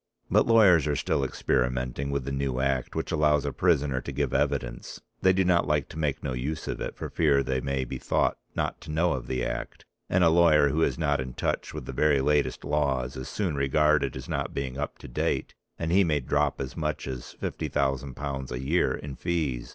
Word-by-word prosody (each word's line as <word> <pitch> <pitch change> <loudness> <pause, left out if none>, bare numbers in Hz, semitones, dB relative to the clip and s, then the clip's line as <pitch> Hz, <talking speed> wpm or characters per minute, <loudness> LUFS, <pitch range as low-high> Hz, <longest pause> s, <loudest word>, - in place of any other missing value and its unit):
But - - +4
lawyers 95 -9 +6
are 75 - +1
still 70 0 0
experimenting 65 +1 -1
with 70 -2 -2
the 70 - -3
new 70 -2 -1
act 65 -1 -1
which - - -2
allows 75 -1 +3
a - - -2
prisoner 75 -7 +2
to 70 - -6
give 70 -1 -1
evidence. 65 -4 -1 0.2
They 95 - +5
do 95 0 +2
not 85 -4 +3
like 75 -2 0
to 80 - -8
make 75 -3 -1
no 65 - -2
use 70 +6 -3
of - - -4
it - - -4
for - - -5
fear 70 -4 +3
they 65 -1 -1
may 70 0 -1
be 65 +1 -6
thought - - 0 0.2
not - - -2
to - - -11
know 80 +1 +2
of 65 -2 -5
the 65 -1 -1
act, - - -5 0.2
and 90 0 +3
a 85 - +6
lawyer 80 -3 +5
who 75 +4 0
is - - +1
not 75 -4 +1
in 65 -1 -6
touch - - -2
with - - -6
the - - -6
very 75 -2 +3
latest 75 +1 +1
laws 70 -3 0
is 65 - -6
soon 95 -7 -1
regarded 75 +2 +2
as - - -8
not - - -3
being 65 -2 -3
up 75 +1 -4
to - - -11
date - - -1 0.2
and 80 0 -2
he 95 +2 +5
may 75 -4 +1
drop 70 +2 0
as 65 -1 -5
much 75 -2 -3
as 65 -1 -6
£50,000 70 0 -2
a 60 - -3
year 75 +7 +1
in 70 -2 -7
fees. 80 -9 -2
70 Hz, 220 wpm, -27 LUFS, 65-75 Hz, 0.2 s, lawyers